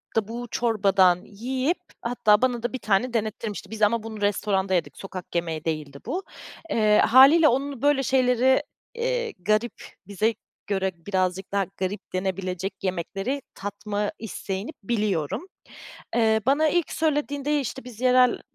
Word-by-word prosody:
da 220 Hz, -2 st, +1 dB
bu 240 Hz, +2 st, -6 dB
çorbadan 195 Hz, -6 st, +3 dB
yiyip 260 Hz, -, -2 dB, 0.2 s
hatta 215 Hz, -3 st, +3 dB
bana 245 Hz, -2 st, +1 dB
da 240 Hz, -, -2 dB
1 260 Hz, -, -3 dB
tane 220 Hz, +4 st, +1 dB
denettirmişti, 215 Hz, -3 st, -3 dB
biz 220 Hz, -, -6 dB
ama 215 Hz, +1 st, +3 dB
bunu 220 Hz, -2 st, -7 dB
restoranda 200 Hz, -2 st, +1 dB
yedik, 175 Hz, -, -1 dB
sokak 185 Hz, -3 st, -8 dB
yemeği 165 Hz, -2 st, -2 dB
değildi 150 Hz, -3 st, -3 dB
bu. 380 Hz, +2 st, -3 dB, 0.5 s
Eee, 215 Hz, -1 st, +3 dB
hâliyle 275 Hz, +7 st, +7 dB
onun 270 Hz, 0 st, 0 dB
böyle 285 Hz, -1 st, +3 dB
şeyleri, 255 Hz, 0 st, +3 dB, 0.3 s
eee, 485 Hz, 0 st, -1 dB
garip, 215 Hz, +6 st, +1 dB, 0.3 s
bize 210 Hz, +3 st, +1 dB, 0.3 s
göre 190 Hz, -1 st, 0 dB
birazcık 185 Hz, -1 st, -1 dB
daha 200 Hz, -1 st, +1 dB
garip 190 Hz, +2 st, -4 dB
denebilecek 185 Hz, 0 st, -2 dB
yemekleri 195 Hz, -, -2 dB
tatma 205 Hz, +1 st, -3 dB
isteğini 205 Hz, +2 st, -5 dB
biliyorum. 205 Hz, -, -1 dB, 0.7 s
Eee, 220 Hz, -2 st, +3 dB
bana 300 Hz, +3 st, +4 dB
ilk 345 Hz, +1 st, 0 dB
söylediğinde, 295 Hz, -2 st, 0 dB
işte, 265 Hz, 0 st, -5 dB
"Biz 245 Hz, -3 st, -11 dB
yerel, 250 Hz, -1 st, +4 dB
220 Hz, 140 wpm, -25 LUFS, 195-255 Hz, 0.7 s, hâliyle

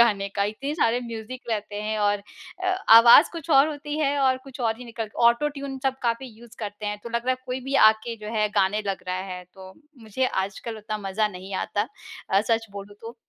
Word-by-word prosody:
गाने 205 Hz, -4 st, +3 dB
का 200 Hz, -, +2 dB
इतने 265 Hz, +8 st, -3 dB
सारे 245 Hz, -6 st, +2 dB
म्यूज़िक 235 Hz, +1 st, -7 dB
रहते 210 Hz, -1 st, -3 dB
हैं 215 Hz, 0 st, -2 dB
और 205 Hz, -1 st, +1 dB, 0.4 s
अ, -, -, +1 dB, 0.3 s
आवाज़ 235 Hz, +6 st, +8 dB
कुछ 330 Hz, -1 st, -7 dB
और 275 Hz, +1 st, +6 dB
होती 295 Hz, 0 st, -5 dB
है 285 Hz, -1 st, +1 dB
और 260 Hz, -1 st, +3 dB
कुछ 270 Hz, -1 st, -11 dB
और 225 Hz, -2 st, 0 dB
ही 250 Hz, -, -9 dB
निकल 225 Hz, -2 st, -6 dB, 0.2 s
ऑटो 235 Hz, +6 st, +3 dB
ट्यून 275 Hz, -2 st, -6 dB
सब 265 Hz, 0 st, 0 dB
काफ़ी 235 Hz, +2 st, -1 dB
यूज़ 235 Hz, -1 st, -15 dB
करते 210 Hz, -1 st, -6 dB
हैं, 210 Hz, 0 st, -3 dB
तो 235 Hz, -, -6 dB
लग 235 Hz, +1 st, -2 dB
रहा 255 Hz, -, +3 dB
है 255 Hz, -, +1 dB
कोई 255 Hz, +1 st, -3 dB
भी 270 Hz, +2 st, -5 dB
आके 220 Hz, +2 st, -2 dB
जो -, -, -5 dB
है 210 Hz, 0 st, +2 dB
गाने 200 Hz, +2 st, +2 dB
लग 195 Hz, -1 st, -3 dB
रहा 185 Hz, -, -1 dB
है, 185 Hz, -1 st, -6 dB
तो 190 Hz, -1 st, -12 dB, 0.3 s
मुझे 225 Hz, +4 st, -1 dB, 0.2 s
आजकल 210 Hz, +3 st, -7 dB
उतना 215 Hz, 0 st, -5 dB
मज़ा 210 Hz, +2 st, +1 dB
नहीं 190 Hz, 0 st, -8 dB
आता। 205 Hz, +3 st, -1 dB, 0.4 s
अ, 195 Hz, +1 st, +4 dB
सच 225 Hz, +1 st, 0 dB
बोलूँ 200 Hz, 0 st, -9 dB
तो। 230 Hz, +2 st, -9 dB
225 Hz, 225 wpm, -25 LUFS, 205-255 Hz, 0.4 s, आवाज़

